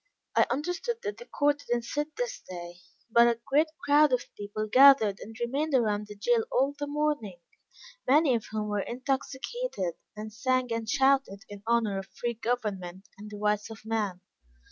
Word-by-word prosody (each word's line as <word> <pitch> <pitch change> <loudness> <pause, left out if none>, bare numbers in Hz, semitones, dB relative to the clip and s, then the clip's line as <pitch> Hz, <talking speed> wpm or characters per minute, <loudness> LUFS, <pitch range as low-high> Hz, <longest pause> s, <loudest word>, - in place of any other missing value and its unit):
I - - +5
understood 355 - -2
that 420 -1 -4
the 485 - -11
court 290 0 +1
did 240 -4 -1
not 240 - -2
sit 295 +5 -3
this - - -3
day, 175 -1 -8 0.3
but 235 +1 +6
a 235 -1 +1
great 300 +4 +3 0.2
crowd 290 0 +5
of 250 -1 -1
people 205 +1 -4
gathered 255 -4 +6
and 225 +2 -10
remained 275 +5 0
around 210 -4 +1
the 210 - -9
jail 230 +3 +2
all 270 +3 +2
the 290 - -2
morning; 290 -10 -1 0.7
many 285 +1 +5
of 230 -2 -2
whom 215 -1 -3
were 205 -1 -1
intoxicated, 265 - -3 0.2
and 215 0 -7
sang 255 +1 0
and 225 -1 -3
shouted 265 -6 +2
in 205 -1 -9
honor 225 -4 +2
of 195 - -8
free 240 0 -1
government, 205 -6 -3
and 210 +1 -9
the 210 - -8
rights 210 +1 0
of 220 -1 -11
man. 210 -5 -2
235 Hz, 180 wpm, -28 LUFS, 210-280 Hz, 0.7 s, but